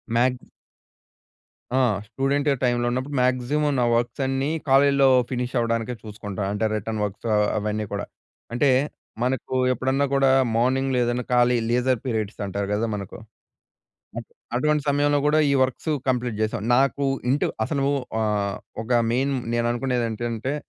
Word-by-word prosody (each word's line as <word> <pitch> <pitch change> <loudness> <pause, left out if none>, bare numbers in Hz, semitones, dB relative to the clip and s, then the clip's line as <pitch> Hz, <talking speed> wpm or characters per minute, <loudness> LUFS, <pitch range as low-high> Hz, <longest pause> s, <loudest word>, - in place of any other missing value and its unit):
Mags 125 +1 +2 1.4
ఆ! - - +4 0.3
Student 140 +6 0
టైంలో 120 -1 +1
ఉన్నప్పుడు 130 +4 -3
మాక్సిమం 130 +4 +1
నా - - +3
వర్క్స్ 120 +3 -1
అన్నీ, 135 +1 -1 0.2
కాలేజీలో 140 0 +5 0.2
ఫినిష్ 125 -1 -3
అవ్వడానికే 115 0 0
చూసుకుంటా. 105 -2 -6
అంటే 105 +2 -1
రిటర్న్ 110 +1 -3
వర్క్స్ 105 +3 -4
ఆహ్, 105 0 +3
అవన్నీ 105 0 -2
కూడా. 100 0 -3 0.5
అంటే, 135 +4 +3 0.5
మనకు 130 0 -2 0.2
ఎప్పుడన్నా 130 +3 0
కూడా 135 -1 +4 0.3
మార్నింగ్‌లో 130 +2 +1
ఏదైనా 120 +1 -1
ఖాళీ 125 0 +4
లీజర్ 125 +1 +1
పీరియడ్స్ 110 -4 -3
అంటారు 100 0 -3
గదా! 110 +3 0
మనకు 100 -2 -7 1.0
అప్పు - - -7 0.2
అటువంటి 150 +3 +1
సమయంలో 145 +1 +2
గూడా, 155 +1 +3
ఈ - - +3
వర్క్స్ 130 +5 -3 0.2
కంప్లీట్ 125 -3 -1
చేశా. 110 +2 -1 0.2
నాకు 140 +2 +2 0.3
ఇంటి 145 - +1 0.2
అసలు 140 0 -1 0.4
ఆహ్, 105 -2 -1 0.3
ఒక 115 - -12 0.2
మెయిన్ 135 +3 +1 0.2
నేను 120 0 +1
అనుకునేది 120 0 -1
ఏంటంటే, 115 +3 -3
125 Hz, 140 wpm, -24 LUFS, 110-135 Hz, 1.4 s, కాలేజీలో